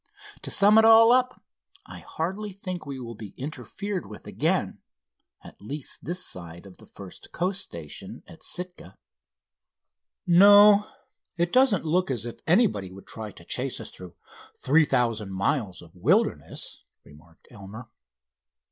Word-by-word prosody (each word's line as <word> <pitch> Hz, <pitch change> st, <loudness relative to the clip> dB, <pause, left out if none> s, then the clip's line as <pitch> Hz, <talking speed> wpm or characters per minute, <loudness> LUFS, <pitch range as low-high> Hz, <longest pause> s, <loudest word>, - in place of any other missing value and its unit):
To -, -, -4 dB
sum 205 Hz, +2 st, +6 dB
it -, -, +5 dB
all 225 Hz, +1 st, +7 dB
up, 255 Hz, 0 st, +1 dB, 0.4 s
I -, -, -11 dB
hardly 195 Hz, +6 st, -5 dB
think 185 Hz, -4 st, -7 dB
we 135 Hz, -2 st, -6 dB
will 115 Hz, -2 st, -7 dB
be 105 Hz, -3 st, -11 dB
interfered 185 Hz, +7 st, -6 dB
with -, -, -12 dB
again—at -, -, -5 dB
least 140 Hz, +7 st, -6 dB
this 180 Hz, +3 st, -2 dB
side 85 Hz, 0 st, -7 dB
of 95 Hz, -2 st, -14 dB
the -, -, -17 dB
first 95 Hz, -2 st, -12 dB
Coast 185 Hz, +3 st, -1 dB
station, 80 Hz, -3 st, -9 dB, 0.2 s
Sitka." 180 Hz, -, -6 dB, 1.3 s
"No, 205 Hz, +3 st, +7 dB, 0.5 s
it 170 Hz, 0 st, -1 dB
doesn't 255 Hz, -9 st, +3 dB
look 175 Hz, +2 st, +1 dB
as 120 Hz, -4 st, -2 dB
if 120 Hz, -, -8 dB
anybody 160 Hz, -, +2 dB
would 95 Hz, +1 st, -13 dB
try 110 Hz, -1 st, -6 dB
to -, -, -15 dB
chase -, -, -2 dB
us -, -, -8 dB
through 90 Hz, -2 st, -12 dB, 0.4 s
three 150 Hz, +4 st, +3 dB
thousand 115 Hz, -7 st, -1 dB
miles 100 Hz, -2 st, -2 dB
of 85 Hz, 0 st, -18 dB
wilderness," 185 Hz, -, -1 dB, 0.2 s
remarked 75 Hz, +3 st, -20 dB
Elmer. 110 Hz, +2 st, -11 dB
150 Hz, 140 wpm, -25 LUFS, -, 1.3 s, all